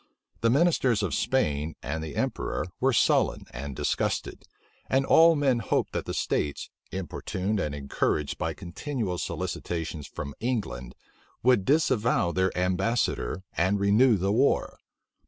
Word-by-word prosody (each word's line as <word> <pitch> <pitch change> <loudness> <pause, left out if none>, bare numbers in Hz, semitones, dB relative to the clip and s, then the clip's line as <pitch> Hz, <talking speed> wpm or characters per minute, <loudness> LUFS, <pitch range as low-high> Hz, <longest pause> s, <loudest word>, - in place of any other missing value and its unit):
The 115 - +2
ministers 130 -6 +3
of 100 - -1
Spain 80 - 0
and 80 +3 -3
the 75 -3 -6
emperor - - -2
were 135 +1 +3
sullen 115 - +2
and 70 +2 -6
disgusted; - - -2 0.4
and 135 +1 +2
all 165 +3 +6
men 135 -5 +2
hoped 110 - -1
that - - -2
the - - -3
states, 75 -1 -2 0.2
importuned 95 +3 -3
and 75 -5 -2
encouraged 70 +1 -1
by 80 -1 -2
continual 95 - -4
solicitations 80 -4 -4
from 70 +1 -6
England, 105 - -3 0.5
would 125 -6 +4
disavow 125 - +2
their 95 +1 +1
ambassador, 95 +2 0
and 95 +4 +2
renew 105 +4 +4
the 95 +2 0
war. 130 +7 +1
95 Hz, 135 wpm, -27 LUFS, 80-125 Hz, 0.5 s, all